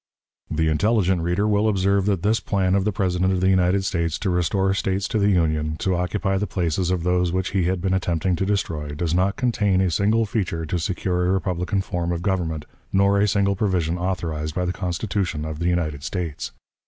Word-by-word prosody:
The 80 Hz, +1 st, 0 dB
intelligent 95 Hz, +2 st, +2 dB
reader 90 Hz, +5 st, 0 dB
will 105 Hz, +1 st, +2 dB
observe 100 Hz, 0 st, +1 dB
that 95 Hz, -4 st, 0 dB
this 110 Hz, +2 st, +2 dB
plan 95 Hz, -3 st, 0 dB
of 100 Hz, 0 st, +2 dB
the 105 Hz, -, +2 dB
President 95 Hz, -1 st, 0 dB
of 95 Hz, -, 0 dB
the 95 Hz, +1 st, +3 dB
United 95 Hz, +1 st, +2 dB
States 85 Hz, -4 st, -1 dB
to 95 Hz, -, -1 dB
restore 95 Hz, +2 st, +1 dB
States 95 Hz, 0 st, -1 dB
to 110 Hz, -, 0 dB
the 100 Hz, 0 st, +3 dB
Union, 80 Hz, -4 st, +1 dB
to 95 Hz, +1 st, 0 dB
occupy 95 Hz, +2 st, -1 dB
the 105 Hz, -, -1 dB
places 90 Hz, -1 st, -1 dB
of 90 Hz, -2 st, 0 dB
those 90 Hz, 0 st, +1 dB
which 95 Hz, +1 st, -1 dB
he 95 Hz, -3 st, +1 dB
had 90 Hz, 0 st, 0 dB
been 95 Hz, 0 st, 0 dB
attempting 90 Hz, 0 st, 0 dB
to 95 Hz, -, -1 dB
destroy, 80 Hz, -8 st, -2 dB
does 80 Hz, +1 st, -1 dB
not 95 Hz, +3 st, +2 dB
contain 105 Hz, -6 st, +1 dB
a 95 Hz, -2 st, +2 dB
single 110 Hz, +6 st, +2 dB
feature 90 Hz, -6 st, -2 dB
to 85 Hz, +3 st, -2 dB
secure 90 Hz, 0 st, -1 dB
a -, -, +2 dB
republican 95 Hz, +1 st, -1 dB
form 85 Hz, -2 st, -3 dB
of 85 Hz, 0 st, -3 dB
government, 85 Hz, -6 st, -1 dB, 0.3 s
nor 100 Hz, +1 st, +3 dB
a 105 Hz, -, +3 dB
single 100 Hz, 0 st, +2 dB
provision 90 Hz, -4 st, 0 dB
authorized 80 Hz, -4 st, -3 dB
by 90 Hz, -, 0 dB
the 90 Hz, -, -1 dB
Constitution 90 Hz, -3 st, -2 dB
of 80 Hz, -1 st, -5 dB
the 85 Hz, -, 0 dB
United 80 Hz, -5 st, -1 dB
States. 85 Hz, -2 st, -4 dB
90 Hz, 210 wpm, -23 LUFS, 85-100 Hz, 0.3 s, the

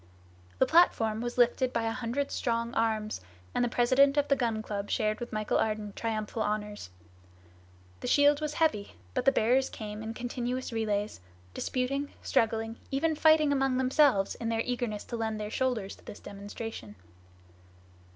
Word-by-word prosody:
The -, -, +4 dB
platform 230 Hz, -9 st, +3 dB
was 240 Hz, +1 st, -4 dB
lifted 250 Hz, +1 st, +3 dB
by 230 Hz, -, -1 dB
a 225 Hz, -, 0 dB
hundred 250 Hz, +4 st, -2 dB
strong 235 Hz, 0 st, -1 dB
arms, 215 Hz, -, 0 dB, 0.3 s
and -, -, +1 dB
the 245 Hz, -, +1 dB
president 260 Hz, +4 st, +4 dB
of 290 Hz, 0 st, +2 dB
the 275 Hz, -, +5 dB
Gun 230 Hz, -4 st, -1 dB
Club 205 Hz, -1 st, -4 dB
shared 215 Hz, -2 st, 0 dB
with 240 Hz, -, -6 dB
Michel 215 Hz, 0 st, 0 dB
Ardan 215 Hz, -2 st, -1 dB
triumphal 220 Hz, -1 st, -3 dB
honors. 210 Hz, -, -3 dB, 1.1 s
The -, -, -5 dB
shield 290 Hz, +1 st, +4 dB
was 300 Hz, -1 st, -2 dB
heavy, 305 Hz, -11 st, +1 dB, 0.2 s
but -, -, -1 dB
the 275 Hz, -, +7 dB
bearers 255 Hz, +2 st, +2 dB
came 210 Hz, -1 st, -7 dB
in 220 Hz, +1 st, -5 dB
continuous 245 Hz, +1 st, -3 dB
relays, 210 Hz, -2 st, -1 dB, 0.3 s
disputing, 275 Hz, +3 st, -2 dB
struggling, 225 Hz, 0 st, 0 dB
even 310 Hz, +4 st, +1 dB
fighting 310 Hz, -1 st, +5 dB
among 270 Hz, -2 st, +1 dB
themselves 260 Hz, -6 st, +3 dB
in 230 Hz, -, -4 dB
their 225 Hz, 0 st, +1 dB
eagerness 240 Hz, -4 st, -2 dB
to 235 Hz, -, -5 dB
lend 220 Hz, -1 st, -2 dB
their 210 Hz, 0 st, -4 dB
shoulders 235 Hz, -7 st, -1 dB
to -, -, -20 dB
this -, -, -9 dB
demonstration. 200 Hz, -, -8 dB
230 Hz, 160 wpm, -29 LUFS, 215-260 Hz, 1.1 s, the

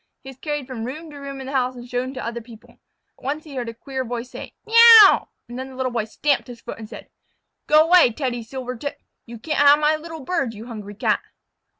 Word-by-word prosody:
He 265 Hz, -, -9 dB
was 260 Hz, -, -17 dB
carried 295 Hz, -3 st, -4 dB
from 250 Hz, -3 st, -7 dB
room 305 Hz, +6 st, -7 dB
to 290 Hz, -, -11 dB
room 275 Hz, -1 st, -7 dB
in 265 Hz, -, -7 dB
the 265 Hz, -, -6 dB
house 255 Hz, -1 st, 0 dB
and 245 Hz, 0 st, -10 dB
shown 250 Hz, +1 st, -3 dB
to 255 Hz, -, -5 dB
other 235 Hz, +1 st, -4 dB
people. 225 Hz, -1 st, -16 dB, 0.4 s
Once 290 Hz, +4 st, -4 dB
he 300 Hz, -, -12 dB
heard 245 Hz, -3 st, -4 dB
a -, -, -7 dB
queer 265 Hz, +2 st, -5 dB
voice 245 Hz, 0 st, -6 dB
say, -, -, -9 dB
"Meouw!" 455 Hz, -2 st, +8 dB, 0.2 s
and 240 Hz, +1 st, -8 dB
then 260 Hz, +1 st, -6 dB
the 260 Hz, -, -12 dB
Little 255 Hz, -1 st, -2 dB
Boy 230 Hz, -3 st, -2 dB
stamped 280 Hz, +6 st, -1 dB
his 245 Hz, -1 st, -10 dB
foot -, -, -8 dB
and 220 Hz, -1 st, -9 dB
said: -, -, -10 dB, 0.6 s
"Go 305 Hz, +1 st, +6 dB
way, 345 Hz, -7 st, +6 dB
Teddy 245 Hz, -1 st, -3 dB
Silvertip. 255 Hz, +3 st, -6 dB, 0.3 s
You 235 Hz, 0 st, -9 dB
can't 305 Hz, +7 st, -3 dB
have 285 Hz, 0 st, +7 dB
my 300 Hz, +1 st, +2 dB
little 320 Hz, 0 st, -8 dB
bird, 270 Hz, -6 st, -2 dB
you 215 Hz, +2 st, -9 dB
hungry 210 Hz, -4 st, -9 dB
Cat." -, -, 0 dB
260 Hz, 235 wpm, -22 LUFS, 240-295 Hz, 0.6 s, Meouw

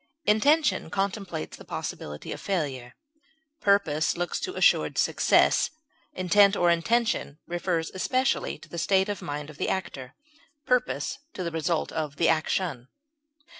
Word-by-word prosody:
Intention 230 Hz, -, +3 dB
contemplates 195 Hz, -, -3 dB
the -, -, -12 dB
possibility 75 Hz, 0 st, -6 dB
of -, -, -6 dB
failure; 140 Hz, -10 st, -3 dB, 0.6 s
purpose 175 Hz, -8 st, +2 dB
looks 175 Hz, 0 st, -2 dB
to 375 Hz, +1 st, -4 dB
assured -, -, +3 dB
success; -, -, +3 dB, 0.5 s
intent 195 Hz, +2 st, +4 dB
or 175 Hz, -2 st, +3 dB
intention 220 Hz, -3 st, 0 dB
refers 175 Hz, -1 st, -2 dB
especially 255 Hz, +8 st, 0 dB
to -, -, -15 dB
the 170 Hz, -, -6 dB
state 190 Hz, +3 st, +2 dB
of 205 Hz, -3 st, -3 dB
mind 145 Hz, +1 st, -5 dB
of 150 Hz, -, -16 dB
the -, -, 0 dB
actor; 135 Hz, -9 st, -4 dB, 0.5 s
purpose 250 Hz, -1 st, 0 dB, 0.2 s
to 185 Hz, -, -3 dB
the 170 Hz, -, -3 dB
result 165 Hz, 0 st, -1 dB
of 155 Hz, -3 st, -3 dB
the 165 Hz, -, +2 dB
action. 155 Hz, -4 st, 0 dB
175 Hz, 135 wpm, -27 LUFS, 155-200 Hz, 0.6 s, intent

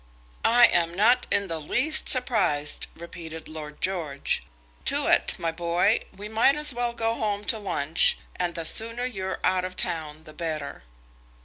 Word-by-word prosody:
"I 240 Hz, +1 st, +6 dB
am 170 Hz, 0 st, 0 dB
not 220 Hz, +6 st, +3 dB
in 200 Hz, -, +1 dB
the 165 Hz, -2 st, -4 dB
least 310 Hz, -, +5 dB
surprised," 205 Hz, -, +2 dB
repeated 165 Hz, -1 st, -9 dB
Lord 150 Hz, -1 st, -10 dB
George. 165 Hz, -7 st, -2 dB, 0.4 s
"Tewett, -, -, +1 dB
my 165 Hz, -, -2 dB
boy, 175 Hz, +6 st, +1 dB, 0.2 s
we 205 Hz, +1 st, -7 dB
might 225 Hz, +6 st, +3 dB
as 300 Hz, -2 st, +1 dB
well 240 Hz, 0 st, -2 dB
go 225 Hz, -1 st, -1 dB
home 210 Hz, -2 st, -2 dB
to 220 Hz, -, 0 dB
lunch, 165 Hz, -6 st, +1 dB, 0.2 s
and 175 Hz, -2 st, -2 dB
the 165 Hz, -2 st, -5 dB
sooner 230 Hz, +7 st, +2 dB
you're 190 Hz, -6 st, -4 dB
out 185 Hz, -1 st, +1 dB
of 185 Hz, 0 st, -6 dB
town 160 Hz, -4 st, -3 dB
the 155 Hz, -, -13 dB
better." 155 Hz, -4 st, -5 dB
185 Hz, 155 wpm, -25 LUFS, 160-225 Hz, 0.4 s, I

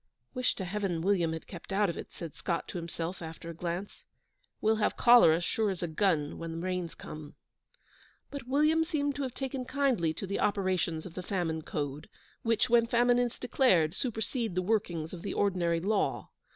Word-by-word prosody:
'Wish 250 Hz, 0 st, +1 dB
to 190 Hz, -, -4 dB
Heaven 180 Hz, -3 st, -2 dB
William 180 Hz, -4 st, +2 dB
had 160 Hz, 0 st, -5 dB
kept 175 Hz, +1 st, -10 dB
out 200 Hz, +1 st, +3 dB
of 170 Hz, -, -2 dB
it,' -, -, -8 dB
said 165 Hz, -4 st, -7 dB
Scott 170 Hz, -2 st, -2 dB
to 180 Hz, -, -4 dB
himself, 170 Hz, +1 st, -5 dB
after 165 Hz, 0 st, -7 dB
a -, -, -8 dB
glance. 175 Hz, +4 st, -5 dB, 0.6 s
'We'll 220 Hz, +1 st, +2 dB
have 215 Hz, -, +1 dB
cholera, 235 Hz, -10 st, +7 dB
sure 215 Hz, +4 st, 0 dB
as 185 Hz, -2 st, -3 dB
a -, -, 0 dB
gun, 160 Hz, -3 st, 0 dB
when 165 Hz, -1 st, -5 dB
the -, -, -5 dB
Rains 180 Hz, -1 st, -3 dB
come.' 155 Hz, -1 st, -9 dB, 1.0 s
But 280 Hz, -4 st, -7 dB
William 305 Hz, +4 st, +3 dB
seemed 290 Hz, -3 st, 0 dB
to -, -, -2 dB
have 260 Hz, -3 st, -3 dB
taken 265 Hz, -1 st, -3 dB
kindly 250 Hz, -, +1 dB
to 195 Hz, -, -4 dB
the 200 Hz, +1 st, -2 dB
operations 185 Hz, -5 st, 0 dB
of 180 Hz, -, -8 dB
the 185 Hz, -, -5 dB
Famine 175 Hz, -4 st, -2 dB
Code, 145 Hz, -2 st, -4 dB, 0.3 s
which, 230 Hz, +1 st, +2 dB
when 235 Hz, -1 st, +4 dB
famine 245 Hz, +1 st, +4 dB
is 245 Hz, -1 st, 0 dB
declared, 190 Hz, -, +3 dB
supersede 225 Hz, -2 st, -2 dB
the 185 Hz, -, +1 dB
workings 175 Hz, -6 st, -1 dB
of 175 Hz, -, -7 dB
the 200 Hz, -, -4 dB
ordinary 175 Hz, -4 st, +1 dB
law. 200 Hz, +3 st, 0 dB
190 Hz, 190 wpm, -30 LUFS, 165-235 Hz, 1.0 s, cholera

